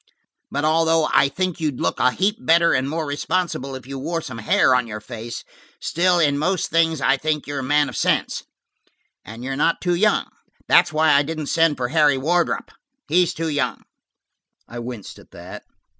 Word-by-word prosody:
But 145 +2 -2
although 160 0 +2
I 135 0 +4
think 180 +4 -3
you'd 150 -5 -2
look 85 - -1
a - - +4
heap 195 - 0
better 170 +1 +4
and 130 +1 0
more 160 +1 -2
responsible 145 -2 -2
if 130 - -9
you 135 0 -7
wore 165 +5 -2
some 125 -7 -8
hair 115 +3 +3
on 125 -1 +1
your 105 -1 -6
face, 115 +2 -8 0.4
still 180 +1 +1
in 145 -4 +2
most 180 +3 -1
things 165 -2 +2
I 135 - +3
think 150 +1 -2
you're 145 0 -4
a - - -4
man 145 +2 +2
of - - -8
sense. - - 0 0.8
And 115 +3 -10
you're 135 +1 -3
not 160 +4 +1
too 175 -1 0
young. 210 +5 +2 0.4
That's 175 -1 +5
why 155 0 +3
I 140 - +5
didn't 155 0 -4
send 165 -3 +3
for 125 -1 -2
Harry 150 -2 +3
Wardrop; 170 +5 0 0.4
he's 175 +1 +3
too 165 0 -2
young." 145 -3 -2 0.8
I 120 - -8
winced 120 -4 -8
at - - -18
that. - - -11
150 Hz, 190 wpm, -21 LUFS, 130-165 Hz, 0.8 s, That's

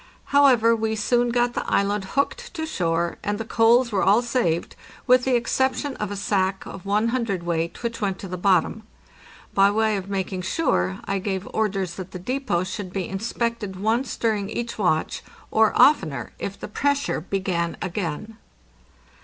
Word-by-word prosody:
However, 250 -5 +5
we 220 0 -1
soon 240 +3 +1
got 240 0 +1
the - - -2
island 200 0 +1
hooked 475 - -1
to 320 -2 -2
shore, 170 - -1
and 205 0 -1
the 225 - -5
coals 235 +2 +4
were 200 - +1
all 210 +5 +4
saved, 230 -9 -1 0.3
with 250 -1 +4
the 260 -1 +3
exception 265 +3 0
of 210 - -3
a 205 - -4
sack 195 -1 0
of 195 +1 -9
one 210 +3 +2
hundredweight, 175 -8 -2
which 230 -1 -3
went 195 -2 -1
to 195 - -8
the 180 - -4
bottom. 185 +3 +2 0.7
By 195 0 +5
way 215 0 +1
of 195 0 -6
making 190 -1 -2
sure, 175 - 0
I 195 0 -1
gave 190 0 -3
orders 195 -5 -1
that 185 0 -8
the - - -4
depot 245 -2 -1
should 185 0 -5
be 185 -2 -3
inspected 220 0 -3
once 220 +6 0
during 210 -3 0
each 235 +1 -4
watch, 165 -5 0 0.3
or 220 0 +4
oftener 155 - +4
if 200 - -5
the - - -6
pressure 285 - 0
began 180 -2 -2
again. 190 +4 -4
205 Hz, 170 wpm, -24 LUFS, 185-235 Hz, 0.7 s, However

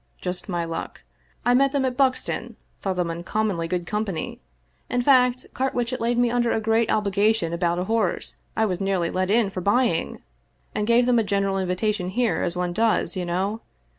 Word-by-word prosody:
Just 180 +1 -3
my 175 -2 -1
luck. 165 0 -6 0.4
I 245 - +4
met 275 +2 +3
them 275 -2 +1
at 255 -1 -1
Buxton, 260 -1 0 0.2
thought 190 -2 -2
them 175 -2 -1
uncommonly 175 +1 -1
good 175 0 -2
company 210 -5 -3 0.2
— - - -41
in 245 0 0
fact, 250 -2 +4
Carwitchet 250 -2 -1
laid 235 +1 +1
me 240 -1 +3
under 240 -1 +1
a - - +1
great 225 +1 +1
obligation 205 -3 +1
about 170 0 0
a 180 - 0
horse 215 -2 -1 0.2
I 220 - +3
was 185 -2 -2
nearly 190 -3 0
let 185 0 -1
in 215 -1 +3
for 185 - -4
buying 205 -3 +1 0.3
— - - -41
and 210 - -1
gave 235 +1 +4
them, 245 -1 +4
a - - +2
general 195 -1 0
invitation 185 +1 -1
here, 235 +3 0
as 175 0 -1
one 180 -1 -1
does, 220 +2 +1
you 180 -1 -2
know. 190 +6 -1
205 Hz, 195 wpm, -24 LUFS, 180-235 Hz, 0.4 s, I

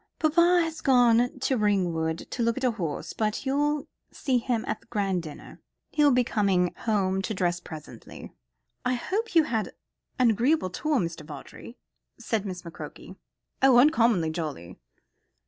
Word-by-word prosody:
"Papa 340 +3 +4
has 325 -1 -5
gone 245 -2 +4
to 265 - +1
Ringwood 175 -6 +1
to 245 - -3
look 230 +1 +1
at 265 - -4
a 250 - +3
horse; 170 -10 -4
but 215 +4 -2
you'll 295 +2 0 0.2
see 260 -4 0
him 235 -2 -1
at - - -3
the - - -26
grand 195 -5 -1
dinner. 155 -3 -11 0.3
He'll 295 -1 +4
be 250 -2 +3
coming 195 -6 +1
home 195 -4 0
to 205 +3 -3
dress 175 -1 0
presently." 155 -3 -11 0.5
"I 250 0 +1
hope 400 - -3
you 325 - +7
had 225 -7 -2 0.4
an 250 -3 +4
agreeable 235 - +1
tour, 305 +9 0
Mr. 170 -7 -3
Vawdrey?" 150 - -11 0.4
said 215 -4 -2
Miss 180 -2 -6
McCroke. 170 -1 -10 0.5
"Oh, 265 -2 +6
uncommonly 235 - +4
jolly." 145 - -6
225 Hz, 155 wpm, -27 LUFS, 180-265 Hz, 0.5 s, you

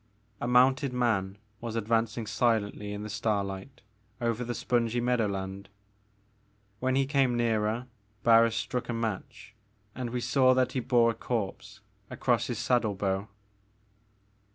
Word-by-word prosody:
A - - -2
mounted 130 +2 +4
man 105 -6 0 0.2
was 115 -1 -5
advancing 115 0 0
silently 105 -3 0
in 105 0 -5
the - - -5
starlight 105 +2 -3 0.4
over 115 0 -1
the 120 0 -4
spongy 120 -1 0
meadowland. 100 -5 -1 1.1
When 130 0 0
he 135 0 +3
came 135 -3 +2
nearer 115 0 0 0.4
Barns 115 -1 +5
struck 125 -1 -3
a - - 0
match, 115 -3 -4 0.4
and 125 -1 -4
we 125 +1 -2
saw 130 +1 +3
that 130 -1 +2
he 130 - -1
bore 120 -1 +3
a - - -5
corpse 110 -2 -4 0.3
across 120 -2 0
his 120 - -3
saddle 115 -5 +1
bow. 95 +1 -1
115 Hz, 135 wpm, -29 LUFS, 105-125 Hz, 1.1 s, Barns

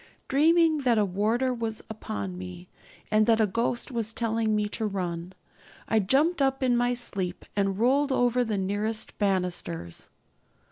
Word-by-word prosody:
Dreaming 320 +2 +4
that 245 -4 +2
a 210 - +3
warder 220 +7 0
was 225 -2 -4
upon 100 - -5
me, 90 -1 -8 0.4
and 215 +1 +4
that 225 -1 +4
a 220 - +5
ghost 230 +6 -2
was 225 -2 -2
telling 225 -1 0
me 210 0 +1
to 220 +1 -2
run, 180 -3 -4 0.5
I 220 - +3
jumped 285 - +2
up 270 0 +1
in 250 -2 +3
my 245 +1 +1
sleep 190 -7 -1
and 195 -1 0
rolled 270 +5 +2
over 245 -1 +2
the 220 -3 -2
nearest 205 +3 -2
banisters. 180 - -2
220 Hz, 155 wpm, -27 LUFS, 195-245 Hz, 0.5 s, a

